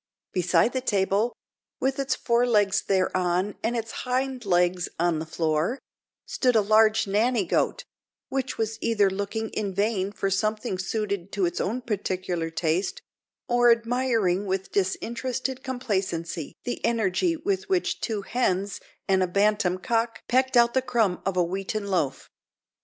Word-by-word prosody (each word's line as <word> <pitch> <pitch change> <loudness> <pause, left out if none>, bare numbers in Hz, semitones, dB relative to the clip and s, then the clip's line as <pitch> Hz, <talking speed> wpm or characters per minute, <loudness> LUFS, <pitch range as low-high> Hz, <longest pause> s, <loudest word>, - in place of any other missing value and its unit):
Beside 185 +6 +2
the 260 - -1
table, 205 0 +1 0.5
with 265 +1 0
its 275 0 0
fore 240 0 +2
legs 205 -4 +3
thereon 185 0 +1
and 235 +2 0
its 225 0 -4
hind 255 -1 -2
legs 180 -1 +2
on 170 -2 +2
the 160 - -5
floor, 160 - 0 0.5
stood 250 -2 +1
a 220 - +6
large 215 +1 +4
nanny 215 +2 +1
goat, - - 0 0.4
which 270 0 -3
was 225 0 -2
either 205 -4 +2
looking 205 +3 -3
in 200 -3 -3
vain 200 -1 0
for 195 -1 -2
something 215 0 -1
suited 200 -1 -2
to 195 -2 +1
its 175 - -1
own 240 +5 -2
particular 185 -6 -2
taste, 165 +3 -1 0.4
or 240 0 +4
admiring 230 -5 +1
with 190 0 -2
disinterested 250 +6 -2
complacency 190 - -3
the 245 - -4
energy 230 - +1
with 380 +5 -2
which 370 -2 0
two 215 -3 -2
hens 200 -4 -1 0.3
and 190 -1 +3
a 185 - +2
bantam 200 -1 +2
cock 230 +3 -1
pecked 260 +1 +2
out 235 0 +5
the 260 - +3
crumb 230 -8 +1
of 190 -1 -1
a 180 - +4
wheaten 195 +4 -3
loaf. 180 -9 -1
210 Hz, 150 wpm, -26 LUFS, 185-240 Hz, 0.5 s, a